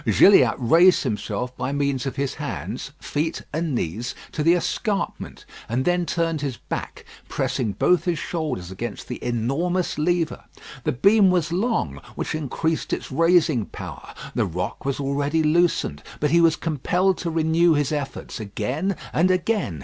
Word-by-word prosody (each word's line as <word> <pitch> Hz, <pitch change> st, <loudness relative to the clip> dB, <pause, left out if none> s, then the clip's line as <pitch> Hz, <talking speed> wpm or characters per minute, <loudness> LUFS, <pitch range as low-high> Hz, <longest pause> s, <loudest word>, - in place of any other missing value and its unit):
Gilliatt 130 Hz, -, +6 dB
raised 170 Hz, +9 st, +5 dB
himself 125 Hz, +4 st, -3 dB
by 130 Hz, +2 st, -3 dB
means 140 Hz, -2 st, 0 dB
of 135 Hz, -, -4 dB
his 140 Hz, -1 st, -1 dB
hands, 135 Hz, -3 st, -5 dB
feet, 155 Hz, +3 st, -2 dB
and 160 Hz, -2 st, -1 dB
knees 115 Hz, +5 st, -3 dB, 0.2 s
to 155 Hz, -, -3 dB
the 165 Hz, +3 st, +5 dB
escarpment, 200 Hz, +3 st, -2 dB, 0.2 s
and 125 Hz, +3 st, 0 dB
then 175 Hz, -1 st, +1 dB
turned 165 Hz, -2 st, 0 dB
his 135 Hz, -5 st, -3 dB
back, -, -, -6 dB, 0.2 s
pressing 110 Hz, -5 st, -1 dB
both 180 Hz, -, +2 dB
his 175 Hz, -3 st, 0 dB
shoulders 150 Hz, -, -3 dB
against 105 Hz, +3 st, -6 dB
the 125 Hz, -, -6 dB
enormous 140 Hz, +11 st, -1 dB
lever. 170 Hz, +1 st, 0 dB, 0.4 s
The -, -, +2 dB
beam 200 Hz, -, +5 dB
was 175 Hz, -3 st, +1 dB
long, 175 Hz, -, -1 dB
which -, -, -3 dB
increased 155 Hz, +1 st, -2 dB
its -, -, -4 dB
raising 160 Hz, -, +3 dB
power. -, -, -9 dB, 0.2 s
The -, -, +1 dB
rock 90 Hz, +9 st, -4 dB
was 140 Hz, 0 st, -1 dB
already 145 Hz, +3 st, 0 dB
loosened; 155 Hz, -, +2 dB, 0.2 s
but 150 Hz, -1 st, +1 dB
he 170 Hz, +1 st, +5 dB
was 165 Hz, -1 st, +5 dB
compelled 175 Hz, +5 st, 0 dB
to 170 Hz, -, -2 dB
renew 165 Hz, +1 st, +3 dB
his 145 Hz, -1 st, 0 dB
efforts 145 Hz, -4 st, -4 dB
again 125 Hz, -, -2 dB, 0.2 s
and 175 Hz, +4 st, +3 dB
again. 185 Hz, -, 0 dB
155 Hz, 155 wpm, -23 LUFS, 125-175 Hz, 0.4 s, Gilliatt